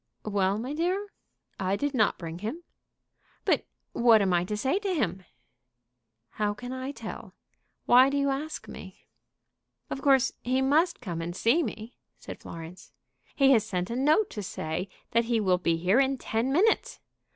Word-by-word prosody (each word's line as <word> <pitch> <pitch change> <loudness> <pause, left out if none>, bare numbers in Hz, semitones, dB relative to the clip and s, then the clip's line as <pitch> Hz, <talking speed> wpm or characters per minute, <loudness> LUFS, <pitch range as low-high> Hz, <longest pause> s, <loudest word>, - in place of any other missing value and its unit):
"Well, 200 -1 +1
my 250 +6 -4
dear? 365 +6 -1 0.5
I 190 0 0
did 285 +6 -2
not 215 -5 +2
bring 165 -1 -7
him." 230 - -5 0.8
"But - - +1 0.3
what 235 -2 +5
am 195 -3 +1
I 175 0 +3
to 210 +3 -3
say 270 - +1
to 395 -3 -2
him?" 190 - -1 1.1
"How 210 -1 -1
can 245 +4 -7
I 260 +1 -4
tell? - - -9 0.5
Why 255 +2 +7
do 280 - -1
you 280 0 +1
ask 300 +3 -4
me?" - - -11 0.9
"Of 270 - -4
course 270 -2 +4
he 255 +2 0
must 305 +6 +2
come 175 -8 -4
and 175 +1 -5
see 235 - +3
me," 225 -3 -6 0.2
said - - -9
Florence. 165 +2 -10 0.4
"He 275 -1 +5
has 225 -5 +5
sent 180 -2 -3
a - - -2
note 305 - +3
to 210 - -5
say 180 0 -4 0.2
that 230 0 +2
he 230 -1 +1
will 185 -4 +2
be 170 -2 +1
here 185 +8 +3
in 270 0 +2
ten 235 +1 -1
minutes." 400 +10 +2
235 Hz, 175 wpm, -28 LUFS, 195-275 Hz, 1.1 s, Why